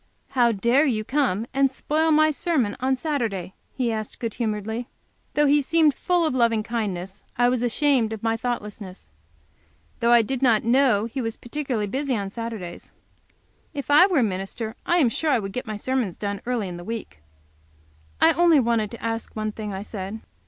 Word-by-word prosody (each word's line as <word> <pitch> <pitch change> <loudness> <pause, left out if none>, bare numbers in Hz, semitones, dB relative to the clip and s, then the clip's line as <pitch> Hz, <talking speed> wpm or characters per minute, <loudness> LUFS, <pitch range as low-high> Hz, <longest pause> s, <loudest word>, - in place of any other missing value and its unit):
"How 240 -3 +3
dare 235 +8 +3
you 220 -5 0
come 245 -5 0
and 270 0 +3
spoil 310 +4 0
my 310 0 +5
sermon 285 - 0
on 265 +1 +1
Saturday?" 230 - -2 0.2
he 245 -3 0
asked, 215 -1 -5
good 230 -3 -3
humoredly. 220 +1 -3 0.5
Though 295 - +4
he 290 +1 +4
seemed 310 +1 +3
full 350 +2 +1
of 310 - 0
loving 230 -3 +2
kindness, 200 -4 -4 0.2
I 245 0 +4
was 250 -1 0
ashamed 245 -1 +2
of 220 -1 -6
my 225 0 +1
thoughtlessness. 210 - -5 0.9
Though 235 - +2
I 235 -1 +7
did 260 +3 -3
not 235 -5 +4
know 235 -3 +3
he 255 +3 -4
was 225 -1 -3
particularly 245 -4 -3
busy 265 +5 -1
on 200 -2 -3
Saturdays. 220 -6 -6 0.8
If 285 0 -4
I 300 +6 +8
were 365 -5 +1
a - - +3
minister 205 +3 -3
I 345 - +3
am 280 -9 +4
sure 310 +7 -1
I 270 - +4
would 195 -3 -5
get 250 - -4
my 215 -1 -4
sermons 245 -4 -1
done 200 -1 -3
early 240 -5 -1
in 175 -1 -6
the 175 - -8
week. 225 - -6 1.0
"I - - +6
only 340 -3 +5
wanted 230 -4 +1
to 235 - -10
ask 225 0 -3
one 215 0 -2
thing," 210 -1 -6
I 190 0 -5
said. 205 +1 -6
235 Hz, 190 wpm, -24 LUFS, 210-270 Hz, 1.0 s, I